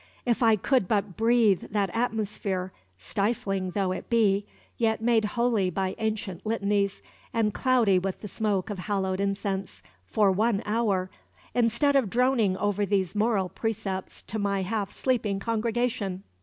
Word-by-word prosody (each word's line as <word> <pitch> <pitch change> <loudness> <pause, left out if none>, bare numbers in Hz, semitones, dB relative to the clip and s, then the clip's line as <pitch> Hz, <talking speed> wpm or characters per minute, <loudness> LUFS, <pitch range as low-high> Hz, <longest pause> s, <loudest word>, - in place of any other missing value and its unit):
"If 240 -1 +1
I 225 -2 +6
could 245 0 +1
but 200 -3 0
breathe 225 -4 +3
that 200 -3 0
atmosphere, 210 -5 -2 0.2
stifling 195 - -1
though 195 -2 +1
it 185 - -5
be, 205 -4 +2 0.3
yet 220 -2 +1
made 225 -1 +2
holy 225 -3 +1
by 190 +1 -1
ancient 215 -5 -3
litanies, 205 -2 0 0.3
and 215 -2 +2
cloudy 240 -8 +3
with 190 +1 -4
the 210 - -6
smoke 205 -2 -1
of 200 - -5
hallowed 190 -1 -1
incense, 195 -1 -2 0.2
for 205 -3 +3
one 215 +2 +1
hour, 205 -4 0 0.4
instead 245 +4 +2
of 260 -7 +3
droning 235 -5 +2
over 205 0 0
these 195 -3 0
moral 210 -3 +1
precepts 195 -2 -4
to 220 - -4
my 200 -1 0
half 200 0 -2
sleeping 220 -6 0
congregation!" 225 -3 -1
205 Hz, 145 wpm, -27 LUFS, 195-225 Hz, 0.4 s, I